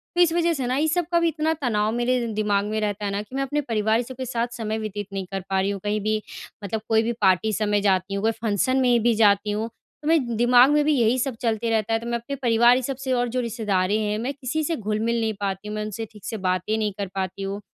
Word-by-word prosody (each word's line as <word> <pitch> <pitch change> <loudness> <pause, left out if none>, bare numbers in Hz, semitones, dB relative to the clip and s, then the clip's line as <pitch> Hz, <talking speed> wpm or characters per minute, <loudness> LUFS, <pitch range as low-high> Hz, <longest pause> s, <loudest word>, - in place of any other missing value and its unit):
तो 350 - +4
इस 335 -2 +4
वज़ह 340 0 +2
से 260 -5 -2
ना 255 - 0
ये 300 +3 +1
सब 345 +1 +1
का 340 - +4
भी 335 - +2
इतना 320 0 0
तनाव 215 -4 +1
मेरे 245 +1 +1
दिमाग़ 205 -1 +1
में 215 +1 -2
रहता 205 0 -2
है 200 - -1
ना 200 - -2
कि 215 +5 -11
मैं 275 - 0
अपने 295 +2 -1
परिवार 220 -2 +1
सब 255 +2 -8
के 260 - -4
साथ 235 0 -1
समय 220 -1 -2
व्यतीत 205 -2 -5
नहीं 195 -1 -3
कर 195 - -2
पा 190 0 +1
रही 195 - 0
हूँ, 200 - -4
कहीं 210 +1 0
भी 215 +1 0 0.4
मतलब 215 +2 -3
कोई 225 0 +4
भी 235 - 0
पार्टी 190 +2 +3
सब 210 0 0
जाती 190 -1 +1
हूँ, 200 +1 -2
कोई 225 - +3
फंक्शन 225 +3 0
में 245 -2 +3
भी 240 - +4
जाती 210 -1 +3
हूँ, 215 +2 -2 0.3
तो 300 - -6
मैं 265 -8 +2
दिमाग़ 245 +3 +6
में 295 0 +4
भी 305 - +3
यही 240 -1 +3
सब 255 -1 -1
चलते 230 -1 0
रहता 225 0 0
है। 225 - +2
तो 230 - -9
मैं 235 0 0
अपने 260 +4 -6
परिवार 240 -1 +4
ये 260 - 0
सब 270 +2 -3
से 260 - -2
और 245 -1 +1
जो 255 - -1
रिश्तेदारें 210 -4 0
हैं 210 0 -1
मैं 250 +5 -2
किसी 280 +3 -3
से 330 +2 -1
घुल 215 -4 -2
मिल 235 0 +1
नहीं 220 -1 0
पाती 195 +1 -3
हूँ, 210 - -4
मैं 215 - -2
उनसे 215 +1 -5
ठीक 210 -3 -14
से 220 - -4
बातें 185 +3 -1
नहीं 215 -2 0
कर 200 - -2
पाती 190 0 -3
हूँ। 195 +1 -3
225 Hz, 285 wpm, -24 LUFS, 210-250 Hz, 0.4 s, दिमाग़